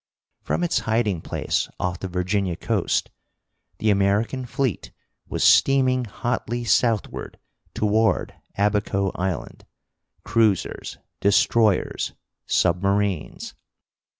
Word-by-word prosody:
From -, -, -1 dB
its 175 Hz, -1 st, +1 dB
hiding 110 Hz, -6 st, 0 dB
place -, -, -2 dB
off 90 Hz, -1 st, -2 dB
the 95 Hz, -, -4 dB
Virginia 90 Hz, 0 st, -1 dB
coast 100 Hz, +1 st, -1 dB, 0.7 s
the 110 Hz, 0 st, +2 dB
American 105 Hz, +6 st, +1 dB
fleet 130 Hz, -3 st, -2 dB, 0.4 s
was -, -, -1 dB
steaming 130 Hz, -2 st, +4 dB
hotly 120 Hz, +2 st, -3 dB
southward 115 Hz, -2 st, 0 dB, 0.4 s
toward 110 Hz, +1 st, +1 dB, 0.2 s
Abaco 100 Hz, -1 st, +1 dB
Island, 90 Hz, -1 st, -4 dB, 0.6 s
cruisers, 105 Hz, -2 st, 0 dB, 0.2 s
destroyers, 100 Hz, +1 st, +2 dB, 0.3 s
submarines. 100 Hz, 0 st, 0 dB
105 Hz, 90 wpm, -23 LUFS, 95-115 Hz, 0.7 s, steaming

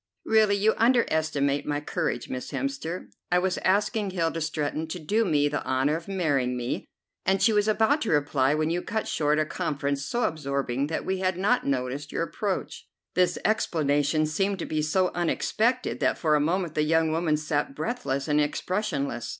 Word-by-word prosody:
"Really, 215 Hz, -2 st, +4 dB
you 210 Hz, +2 st, +3 dB
underestimate 160 Hz, -, +2 dB
my 145 Hz, -1 st, 0 dB
courage, 125 Hz, -4 st, -2 dB
Miss 130 Hz, 0 st, -5 dB
Hemster. 270 Hz, -11 st, -4 dB, 0.2 s
I 180 Hz, -, +4 dB
was 185 Hz, 0 st, 0 dB
asking 205 Hz, +2 st, +1 dB
Hilda 165 Hz, -3 st, -1 dB
Stretton 155 Hz, 0 st, -2 dB
to 160 Hz, -, -5 dB
do 205 Hz, +8 st, +1 dB
me 150 Hz, -7 st, +2 dB
the 145 Hz, -, -2 dB
honour 130 Hz, +3 st, +1 dB
of 165 Hz, +2 st, -6 dB
marrying 145 Hz, -10 st, 0 dB
me, 120 Hz, 0 st, -3 dB, 0.4 s
and 190 Hz, +1 st, +2 dB
she 220 Hz, +4 st, +4 dB
was 210 Hz, 0 st, +2 dB
about 220 Hz, +8 st, +3 dB
to 225 Hz, -, -1 dB
reply 145 Hz, -2 st, +2 dB
when 155 Hz, +1 st, 0 dB
you 175 Hz, +1 st, 0 dB
cut 220 Hz, +3 st, -3 dB
short 150 Hz, 0 st, +1 dB
a 155 Hz, -, +2 dB
conference 140 Hz, -2 st, -2 dB
so 240 Hz, +10 st, -1 dB
absorbing 140 Hz, -, -1 dB
that 160 Hz, -, -3 dB
we 190 Hz, 0 st, -1 dB
had 185 Hz, -1 st, 0 dB
not 205 Hz, -, +1 dB
noticed 135 Hz, +2 st, -2 dB
your -, -, -1 dB
approach." 195 Hz, +2 st, -4 dB, 0.3 s
This 180 Hz, -1 st, +2 dB
explanation 155 Hz, -7 st, +1 dB
seemed 195 Hz, +6 st, 0 dB
to 170 Hz, -, -4 dB
be 155 Hz, -1 st, -1 dB
so 180 Hz, +4 st, +1 dB
unexpected 225 Hz, +8 st, 0 dB
that -, -, +1 dB
for 155 Hz, -2 st, +1 dB
a 150 Hz, -, +4 dB
moment 170 Hz, +2 st, 0 dB
the 155 Hz, -, +1 dB
young 160 Hz, +1 st, +2 dB
woman 160 Hz, -1 st, +1 dB
sat 150 Hz, -, -2 dB
breathless 145 Hz, -, -2 dB
and 150 Hz, 0 st, +3 dB
expressionless. 145 Hz, -, -2 dB
160 Hz, 180 wpm, -26 LUFS, 145-195 Hz, 0.4 s, Really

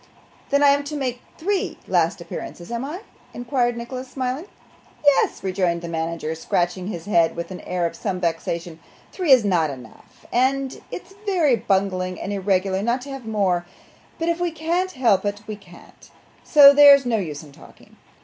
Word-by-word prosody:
'Then 280 Hz, +1 st, +3 dB
I 285 Hz, -, +7 dB
am 285 Hz, +1 st, +3 dB
to 300 Hz, +1 st, -5 dB
make 250 Hz, -3 st, -3 dB, 0.2 s
three 390 Hz, +3 st, -1 dB
last -, -, +1 dB
appearances, 235 Hz, -, -8 dB
am 235 Hz, +1 st, -3 dB
I?' 315 Hz, +8 st, -6 dB, 0.3 s
inquired 240 Hz, -1 st, 0 dB
Nicholas, 255 Hz, +2 st, -6 dB
smiling. 260 Hz, +5 st, -3 dB, 0.6 s
'Yes,' 285 Hz, -7 st, +3 dB
rejoined 180 Hz, -3 st, -1 dB
the -, -, -4 dB
manager, 165 Hz, -1 st, -3 dB
scratching 175 Hz, +3 st, -1 dB
his 170 Hz, -5 st, -6 dB
head 170 Hz, -5 st, +2 dB
with 170 Hz, +2 st, -5 dB
an 185 Hz, -, -7 dB
air 180 Hz, -1 st, -2 dB
of 170 Hz, -, -3 dB
some 190 Hz, -4 st, -3 dB
vexation; 170 Hz, -1 st, -3 dB, 0.3 s
'three 360 Hz, -6 st, 0 dB
is 250 Hz, -5 st, +7 dB
not 170 Hz, -6 st, +2 dB
enough, 125 Hz, -5 st, -13 dB
and 265 Hz, +2 st, 0 dB
it's 360 Hz, +1 st, -8 dB
very 335 Hz, -10 st, +3 dB
bungling 190 Hz, -4 st, -1 dB
and 205 Hz, -, -4 dB
irregular 190 Hz, -1 st, 0 dB
not 235 Hz, +4 st, 0 dB
to 280 Hz, -, -8 dB
have 270 Hz, -4 st, -8 dB
more, 190 Hz, -5 st, 0 dB, 0.5 s
but 330 Hz, -, -2 dB
if 340 Hz, 0 st, 0 dB
we 350 Hz, 0 st, 0 dB
can't 340 Hz, +4 st, -2 dB
help 230 Hz, -8 st, +2 dB
it 205 Hz, 0 st, -3 dB
we 215 Hz, -, -5 dB
can't, 180 Hz, -4 st, -17 dB, 0.3 s
so 285 Hz, -2 st, +8 dB
there's 280 Hz, -1 st, +8 dB
no 235 Hz, -2 st, +1 dB
use 155 Hz, -7 st, -5 dB
in 150 Hz, -, -14 dB
talking. -, -, -18 dB
220 Hz, 180 wpm, -22 LUFS, 180-280 Hz, 0.6 s, so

